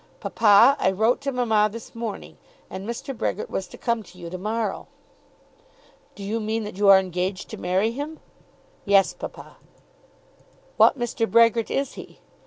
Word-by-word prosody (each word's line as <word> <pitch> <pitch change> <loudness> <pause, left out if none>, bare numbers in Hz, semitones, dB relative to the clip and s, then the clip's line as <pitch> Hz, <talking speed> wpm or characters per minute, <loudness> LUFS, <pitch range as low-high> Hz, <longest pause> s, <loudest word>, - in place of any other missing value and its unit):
"Papa, 225 +5 +5
I - - +3
wrote 220 +7 +1
to 275 0 -2
mamma 220 -4 +2
this 230 +1 -10
morning, 230 -3 -7 0.3
and 195 +4 -6
Mr. 245 +3 -5
Brehgert 215 - -3
was 190 - -3
to - - -13
come 235 -1 -1
to 180 -3 -16
you 170 -2 -9
to 185 - -5
morrow." 215 0 -3 1.3
"Do 200 - -9
you 215 +3 -2
mean 220 +1 -2
that 210 -1 -7
you 200 +1 +1
are 195 - +9
engaged 185 0 -3
to - - -6
marry 190 +5 0
him?" 290 +5 -6 0.6
"Yes, 195 -1 +3
papa." - - -10 1.2
"What - - +5
Mr. 240 -2 -2
Brehgert 230 0 +4
is 275 -1 -2
he?" - - -12
215 Hz, 165 wpm, -24 LUFS, 195-235 Hz, 1.3 s, are